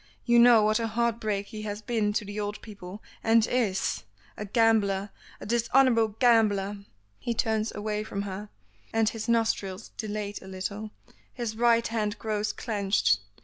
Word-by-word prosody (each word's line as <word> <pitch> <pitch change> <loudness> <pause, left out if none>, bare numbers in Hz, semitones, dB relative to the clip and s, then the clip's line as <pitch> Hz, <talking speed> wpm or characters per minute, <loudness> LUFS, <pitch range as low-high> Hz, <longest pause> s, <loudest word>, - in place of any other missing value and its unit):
You 235 -1 +5
know 235 -2 +7
what 215 +2 +2
a 230 - -1
heart 235 +1 0
break 205 -2 -2
he 215 - -7
has 210 -1 -4
been 220 -4 0
to 210 - -1
the 205 +1 -5
old 205 0 -3
people, 200 -1 -10 0.2
and 225 0 +4
is! 220 -7 0 0.3
A 210 - -5
gambler, 205 -2 +2 0.3
a - - -8
dishonorable 235 +1 +3
gambler!" 210 -5 +3 0.4
He 235 - -2
turns 220 -1 0
away 210 0 -2
from 200 -2 -4
her, 200 +1 -6 0.4
and 225 -1 +2
his 225 0 -5
nostrils 220 -4 0
dilate 210 -1 -4
a 190 - -12
little; 200 +3 -5 0.5
his 235 -3 -3
right 235 0 +3
hand 215 -2 -2
grows 215 -1 -2
clenched. 200 - +1
215 Hz, 160 wpm, -27 LUFS, 205-230 Hz, 0.5 s, know